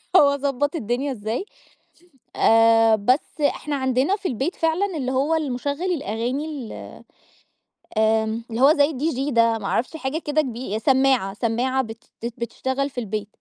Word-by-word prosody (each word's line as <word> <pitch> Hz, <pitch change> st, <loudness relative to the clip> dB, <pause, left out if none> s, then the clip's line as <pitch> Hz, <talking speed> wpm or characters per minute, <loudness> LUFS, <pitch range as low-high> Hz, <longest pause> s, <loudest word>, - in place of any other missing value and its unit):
وأضبط 285 Hz, -1 st, +3 dB
الدنيا 255 Hz, +1 st, -2 dB
إزاي، 225 Hz, -, -3 dB, 0.9 s
آآ، 225 Hz, 0 st, +5 dB
بس 255 Hz, +8 st, 0 dB
إحنا 290 Hz, 0 st, 0 dB
عندنا 260 Hz, +7 st, +1 dB
في 400 Hz, -2 st, -4 dB
البيت 270 Hz, -, -2 dB
فعلًا 335 Hz, +3 st, 0 dB
اللي 260 Hz, -3 st, -2 dB
هو 275 Hz, +5 st, +1 dB
المشغل 285 Hz, 0 st, -2 dB
الأغاني 255 Hz, +1 st, -2 dB
ال 285 Hz, -8 st, -6 dB, 1.2 s
آمم 220 Hz, +1 st, +1 dB
اللي 230 Hz, +2 st, -3 dB
هو 280 Hz, +3 st, +7 dB
زي 290 Hz, 0 st, +3 dB
الDJ 275 Hz, 0 st, -1 dB
ده 230 Hz, -1 st, +3 dB
ما 200 Hz, -, -8 dB
أعرفش 255 Hz, +10 st, -1 dB
حاجة 275 Hz, +1 st, -3 dB
كده 305 Hz, -1 st, +1 dB
كب 240 Hz, -5 st, -4 dB
سماعة 265 Hz, -7 st, +3 dB
سماعة 245 Hz, +5 st, 0 dB
بت 225 Hz, -1 st, -10 dB, 0.2 s
بت 235 Hz, -, -3 dB
بتشتغل 260 Hz, +4 st, -2 dB
في 265 Hz, -, -27 dB
البيت. 210 Hz, -2 st, -4 dB
260 Hz, 150 wpm, -23 LUFS, 230-290 Hz, 1.2 s, هو